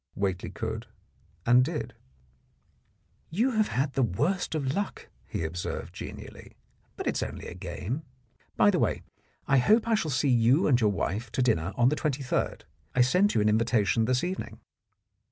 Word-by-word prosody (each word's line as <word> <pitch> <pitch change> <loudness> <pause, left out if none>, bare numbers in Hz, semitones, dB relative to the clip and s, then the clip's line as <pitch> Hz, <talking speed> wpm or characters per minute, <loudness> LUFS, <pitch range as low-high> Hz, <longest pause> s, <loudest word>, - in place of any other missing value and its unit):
Whately 95 -3 -2
could - - -5 0.6
and 125 +2 +6
did. 155 +3 -3 1.4
"You 225 +11 +1
have 215 -3 +2
had 135 +2 -1
the 135 - +1
worst 145 - 0
of 140 -3 -1
luck," 200 +3 -4 0.2
he - - -3
observed 85 +2 -4
genially, - - -9 0.4
"but - - -5
it's - - 0
only - - -5
a - - -7
game. 95 - -5 0.6
By 205 - +6
the 185 - +1
way, 105 - 0 0.4
I 135 -1 +5
hope 220 - +4
I 230 - +2
shall 210 -8 +1
see 140 +1 +1
you 125 +6 +4
and 125 -4 +3
your 105 - +4
wife 105 +3 -2
to 130 - +1
dinner 95 -7 +1
on 120 +2 +4
the 150 - 0
23rd. 140 -4 -1 0.3
I 125 - +5
sent 180 +12 +3
you - - +3
an 105 - +3
invitation 110 -2 +2
this 125 +2 +1
evening." 175 -12 -4
125 Hz, 170 wpm, -28 LUFS, 110-155 Hz, 1.4 s, and